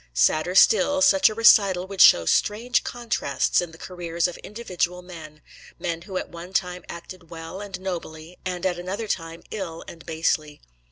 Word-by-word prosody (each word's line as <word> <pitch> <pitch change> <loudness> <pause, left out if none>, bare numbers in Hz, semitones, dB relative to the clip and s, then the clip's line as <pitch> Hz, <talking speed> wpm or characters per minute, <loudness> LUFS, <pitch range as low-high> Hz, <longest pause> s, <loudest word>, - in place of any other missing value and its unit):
Sadder 155 - +2
still, 280 +8 +5
such 285 0 +5
a 215 - -6
recital 200 -5 +5
would 195 -1 -2
show 85 - +7
strange 220 - +1
contrasts 235 -14 -1
in 175 -2 -6
the 160 - -14
careers 170 -1 -2
of 180 - -7
individual 180 -5 -4
men, 155 -4 -12 0.3
men 165 -1 -4
who 185 +1 -6
at - - -4
one 170 +2 -10
time 180 -1 -1
acted 170 0 -10
well 165 +3 -8
and 195 -3 -7
nobly, 170 -2 -7
and 180 0 -4
at 180 -2 0
another 195 +5 -4
time 165 -4 -4
ill 180 -6 -5
and 165 -1 -11
basely. 155 -2 -1
180 Hz, 170 wpm, -24 LUFS, 165-195 Hz, 0.3 s, show